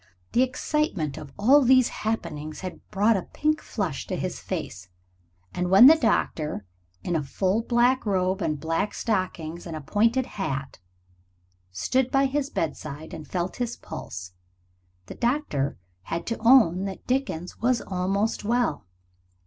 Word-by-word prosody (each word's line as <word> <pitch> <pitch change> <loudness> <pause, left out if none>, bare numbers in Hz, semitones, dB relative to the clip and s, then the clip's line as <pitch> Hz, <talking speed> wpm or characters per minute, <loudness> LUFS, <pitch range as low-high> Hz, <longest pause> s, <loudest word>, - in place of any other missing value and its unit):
The 245 - +3
excitement 255 - 0
of 145 - -9
all 265 +8 +6
these 255 -1 +5
happenings 155 -8 -4
had 185 -1 -7
brought 210 +3 +3
a 190 - 0
pink 305 +1 +1
flush 180 - -3
to - - -2
his - - -3
face, 95 +2 -5 0.6
and 180 0 -1
when 195 +6 +9
the 295 - +11
doctor, 160 - 0 0.4
in 175 - -1
a 160 - +1
full 190 +9 0
black 245 +2 +2
robe 190 -1 0
and 155 -3 -1
black 165 +7 -1
stockings 175 -5 -2
and 165 - -5
a 155 - -5
pointed 230 - +2
hat, 135 - -4 0.9
stood 245 - 0
by 270 +1 +3
his 275 +1 -1
bedside 155 - -4
and 155 - -8
felt 180 0 -3
his 240 -1 -3
pulse, 90 0 -8 0.7
the - - -8
doctor 235 - -1 0.3
had 170 - -3
to 230 - -3
own 220 -6 +5
that 195 -1 -6
Dickie 260 -8 0 0.2
was 245 0 +2
almost 195 +4 -1
well. 235 - 0
195 Hz, 150 wpm, -26 LUFS, 160-245 Hz, 0.9 s, the